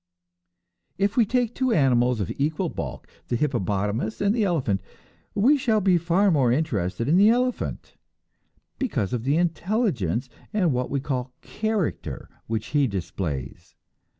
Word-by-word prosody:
If 200 +2 +1
we 230 -4 +4
take 245 -1 +1
two 260 -1 0
animals 125 - +3
of 100 - -2
equal 155 +5 -1
bulk, - - -6 0.2
the 120 - -1
hippopotamus 110 -4 -1
and 200 0 +2
the 230 -2 +1
elephant, 135 - 0 0.5
we 255 +9 +5
shall 225 -4 +2
be 185 -3 +3
far 180 +4 +3
more 135 -7 +3
interested 115 - -1
in 160 +5 +4
the 205 +3 +7
elephant, 250 +1 -1 0.8
because 130 - -1
of 120 -1 -2
the 140 +3 +2
intelligence 170 - 0 0.3
and 180 -8 +2
what 125 0 -1
we 140 - 0
call 130 -2 -3
"character" 215 -5 -3 0.2
which 110 -1 -3
he 145 -2 +2
displays. 85 - -5
150 Hz, 145 wpm, -25 LUFS, -, 0.8 s, the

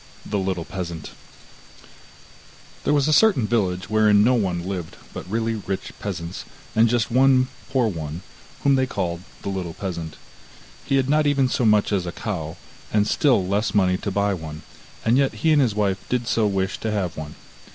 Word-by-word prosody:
THE 105 - -1
LITTLE 95 -3 -2
PEASANT 85 -4 -6 1.7
There - - +3
was 145 -1 +2
a 155 - +3
certain 195 - +5
village 95 -5 0
wherein 105 -1 +4
no 125 +3 +4
one 90 -6 0
lived 90 -4 -5 0.2
but - - -7
really 115 +2 0
rich 100 -3 -4
peasants, 90 -3 -5 0.3
and 110 +1 +5
just 120 0 +1
one 130 +1 +4 0.2
poor 130 -3 +2
one, 80 -3 -5 0.4
whom 140 - +4
they 130 -1 +2
called 85 -6 -3 0.2
the - - -3
little 90 -4 -4
peasant. 85 -5 -5 0.7
He 135 - +1
had 135 -1 +2
not 150 +1 +3
even 140 -2 +3
so 125 -1 0
much 105 -1 +3
as 95 -3 0
a - - -2
cow, 85 -7 -5 0.3
and 105 0 +2
still 120 - +3
less 105 +4 0
money 90 -2 +3
to 100 - -4
buy 100 +1 +1
one, 80 -3 -7 0.4
and 115 +4 +4
yet 135 -1 +2
he 160 -1 +2
and 145 - +5
his 115 -6 +1
wife 100 -2 +1
did 125 -1 0
so 110 -3 +2
wish 95 -1 -1
to 110 - -2
have 100 -5 -1
one. 75 -1 -7
105 Hz, 185 wpm, -23 LUFS, 90-120 Hz, 1.7 s, certain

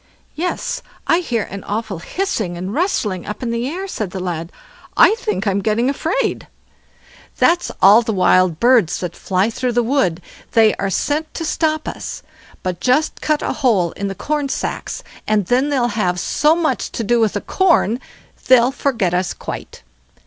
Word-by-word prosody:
"Yes, 350 +3 -3 0.2
I 330 - +3
hear 240 - -1
an 195 0 -8
awful 210 -3 -3
hissing 215 - -2
and 185 +3 -4
rustling 225 - -1
up 210 +4 -5
in 235 - -1
the 235 +3 -1
air," 375 +5 -4
said 215 - -4
the 190 - -6
lad; 170 -2 -4 0.5
"I - - +7
think 210 - -2
I'm 200 -1 +1
getting 225 +6 +1
afraid." 335 - -1 0.9
"That's 345 +1 +3
all 205 +4 +8
the 225 - -2
wild 185 -3 +3
birds 235 -8 +4
that 175 -2 -4
fly 190 +4 0
through 250 +2 -2
the 240 +1 +2
wood. 225 - +1 0.3
They 220 -2 +5
are 195 - -1
sent 300 - -1
to 330 - -3
stop 310 0 0
us; - - -6 0.4
but 180 -2 -3
just 255 - +1
cut 305 -1 0
a - - -1
hole 210 - +2
in 200 - -4
the 195 - -4
corn 295 +2 -2
sacks, - - -4 0.2
and 215 -2 +2
then 255 +8 +2
they'll 255 -4 +1
have 185 -5 0
so 300 - +2
much 315 -7 -1
to 230 - -2
do 235 +3 +2
with 220 -2 +2
the 205 - -2
corn, 335 - +2 0.5
they'll 255 0 +6
forget 235 -10 0
us 180 0 0
quite." - - -8
230 Hz, 180 wpm, -19 LUFS, 190-290 Hz, 0.9 s, all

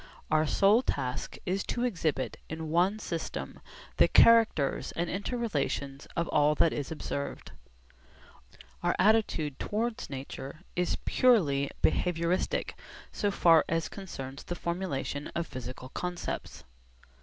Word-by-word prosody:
Our 155 0 +3
sole 200 +9 +4
task 130 - -3
is 190 +2 0
to 240 - -2
exhibit 165 - -1
in 160 -1 -5
one 180 +5 +3
system 170 -6 -5 0.4
the - - +6
characters 225 -11 +5
and 170 +1 -2
inter 205 +6 -3
relations 140 -9 -2
of 170 0 0
all 150 0 +3
that 160 - +3
is 145 0 -4
observed. 140 -2 -5 1.3
Our - - +1
attitude 185 -8 +2
towards 225 +2 -2
nature 135 +2 -7
is 180 0 0
purely 150 - +3
'behaviouristic,' 175 +1 +1 0.4
so 205 - 0
far 165 -5 +5
as 165 0 0
concerns 140 -9 -7
the 175 - -5
formulation 170 -5 -3
of 170 - -1
physical 130 -2 -8
concepts. 175 - -5
165 Hz, 120 wpm, -30 LUFS, 140-195 Hz, 1.3 s, the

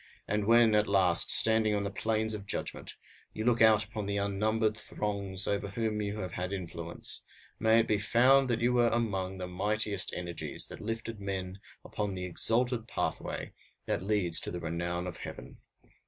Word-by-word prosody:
And 105 0 0
when, 115 -1 +6
at 105 0 +3
last, 90 -4 +3
standing 110 -1 +4
on 100 - 0
the 100 - -3
plains 110 +2 0
of 100 -2 -6
judgment, - - -4 0.4
you 110 - -4
look 120 -2 +3
out 110 -1 +6
upon 105 -2 -5
the 100 0 -1
unnumbered 105 +2 +1
throngs 100 -3 -2
over 100 0 -1
whom 105 +1 -2
you 105 +1 -3
have 90 -2 -4
had 90 +2 -4
influence, 85 -3 -5 0.4
may 110 +1 +5
it 115 - -3
be 105 - +2
found 130 +5 +4
that 115 -1 0
you 120 +1 +3
were 120 -1 +4
among 95 -5 -1
the 90 - -4
mightiest 100 +2 -1
energies 85 -2 -4
that - - -8
lifted 115 0 -4
men 95 -1 -4 0.3
upon 105 -2 -3
the 90 0 -4
exalted 115 +6 +1
pathway - - -3 0.3
that - - -1
leads 95 -4 +1
to - - -3
the 90 - -4
renown 85 +1 -3
of 90 - -6
heaven. - - -9
105 Hz, 180 wpm, -31 LUFS, 95-110 Hz, 0.4 s, when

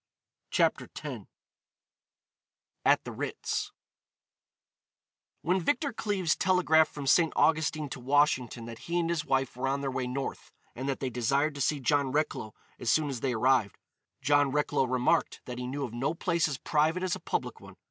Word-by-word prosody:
CHAPTER - - +1
X - - -6 1.6
AT - - +4
THE - - -6
RITZ - - -3 1.7
When 180 +3 +1
Victor 285 - 0
Cleves 200 -6 0
telegraphed 165 -4 +3
from 145 -2 -6
St. 165 +3 +4
Augustine 155 -1 +2
to 130 - -6
Washington 130 -3 +1
that 115 -1 -8
he 170 +1 -3
and 170 0 0
his 165 -3 -1
wife 135 -3 0
were 125 +2 -2
on 140 +1 0
their 135 -1 -2
way 130 -1 -2
North, 135 +2 -5 0.2
and 130 +3 -3
that 135 - -2
they 130 -2 -2
desired 135 +6 +1
to 140 - -6
see 145 +2 +1
John 140 0 +1
Recklow 145 -7 -2 0.2
as 120 - -2
soon 150 +4 +3
as 130 -4 -4
they 130 +1 -1
arrived, 120 -3 +2 0.5
John 145 0 +3
Recklow 150 -2 +1
remarked 125 0 +1
that 125 -1 -6
he 125 - -4
knew 140 +2 -3
of 120 -4 -5
no 130 +7 -1
place 170 -2 +1
as 140 -4 -3
private 160 +6 +1
as 185 -2 0
a - - -8
public - - -3
one. - - -13
140 Hz, 175 wpm, -29 LUFS, 130-160 Hz, 1.7 s, AT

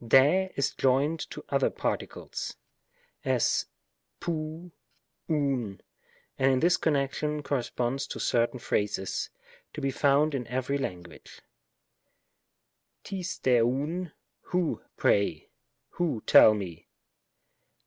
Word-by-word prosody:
Sr^ 145 +11 +5
is 140 - +1
joined 140 +5 +2
to - - -9
otter - - +2
particles; - - -4 0.7
as, - - +1 0.5
tiov^ 165 +1 -4 0.6
ovvy 135 -10 0 0.6
and 135 0 +4
in 130 - +2
this 175 +4 +4
connection 150 0 0
corre 140 -2 0
sponds 125 +3 -2
to - - -6
certain 120 +1 +1
phrases, 105 -4 -1 0.4
to - - -6
be 135 - 0
found 145 +3 +3
in 125 -4 -3
every 130 +3 -1
lan 90 -9 -3
guage, 85 -2 -14 1.7
rig 195 -1 -3
Srj 130 -9 +2
ovv; 150 +9 -1 0.2
" - - -54
who, 180 -3 0 0.2
pray? 100 -6 +1
" - - -52
" - - -53
who, 155 -11 -1
tell 110 - +8
me 90 -5 -6
135 Hz, 120 wpm, -28 LUFS, 120-155 Hz, 1.7 s, tell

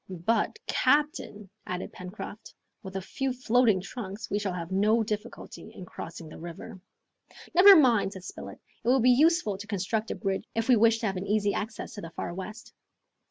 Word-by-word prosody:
"But, 225 -1 +1
captain," 285 - +1 0.2
added 180 0 -5
Pencroft, 190 +3 -9 0.3
"with 190 -2 -9
a 190 - -3
few 270 +7 -2
floating 245 -4 +3
trunks 200 +1 -7
we 205 - +1
shall 205 -2 -2
have 170 0 -6
no 215 +4 +3
difficulty 215 +2 -6
in 185 - -10
crossing 165 -1 -8
the 155 - -11
river." 175 +4 -9 0.7
"Never 385 +3 +9
mind," 235 - +4
said 190 - -10
Spilett, - - -9 0.3
"it - - -7
will 260 +2 +5
be 250 +1 +5
useful 295 - +3
to 205 - -8
construct 215 +2 -2
a - - -2
bridge 195 -2 -3
if 225 0 -1
we 255 - +6
wish 225 0 +4
to - - -1
have 195 -2 -1
an 185 - -5
easy 205 0 +1
access 220 +2 -5
to 205 - -7
the 165 - -7
Far 170 - -5
West!" 210 +5 -8
210 Hz, 190 wpm, -28 LUFS, 190-235 Hz, 0.7 s, Never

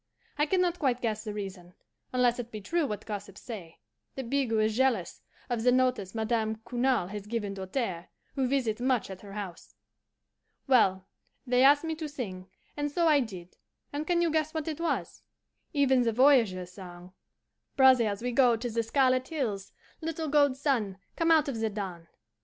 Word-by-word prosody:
I 295 +1 +1
can 370 +3 +2
not 355 -1 0
quite 255 -4 +1
guess 220 -3 -2
the 215 - -4
reason, 185 -4 -7 0.4
unless 250 -1 +2
it 240 -1 -5
be 215 - -6
true 325 - 0
what 210 -1 -5
gossips 205 -2 -7
say, 185 -9 -8 0.4
that 265 -3 -6
Bigot 265 -5 +1
is 215 0 +1
jealous 245 -8 +1 0.3
of 240 -2 -1
the 250 +2 +4
notice 250 -6 +1
Madame 220 0 0
Cournal 245 -6 +1
has 205 -1 -6
given 210 -3 -2
Doltaire, 190 -2 -3 0.3
who 265 -2 0
visits 245 -4 0
much 250 -5 +1
at 190 - -9
her 200 -1 -11
house. 195 -5 -7 0.9
"Well, 190 -8 +3 0.4
they 250 0 +3
asked 285 +2 +6
me 325 0 -2
to 315 -2 -4
sing, 190 -10 -6 0.3
and 290 0 -1
so 335 +3 +1
I 300 -2 +5
did; 185 -8 -6 0.4
and 300 +2 -3
can 345 -1 +2
you 335 - +1
guess 315 0 0
what 315 -1 -2
it 315 -1 -3
was? 335 - -2 0.5
Even 270 -4 +3
the 235 -1 +2
voyageurs' 225 -9 +4
song, 180 -1 -11 0.6
'Brothers, 240 -6 +4
we 245 - -1
go 245 -1 +4
to 235 +1 -4
the 230 +1 +1
Scarlet 255 +2 +2
Hills, 220 -11 -3 0.3
(Little 320 -1 -3
gold 285 -2 +3
sun, 235 -9 0 0.2
come 330 0 +1
out 315 -3 +5
of 255 -5 -3
the 220 0 0
dawn!) 190 -5 -6
240 Hz, 180 wpm, -29 LUFS, 205-275 Hz, 0.9 s, asked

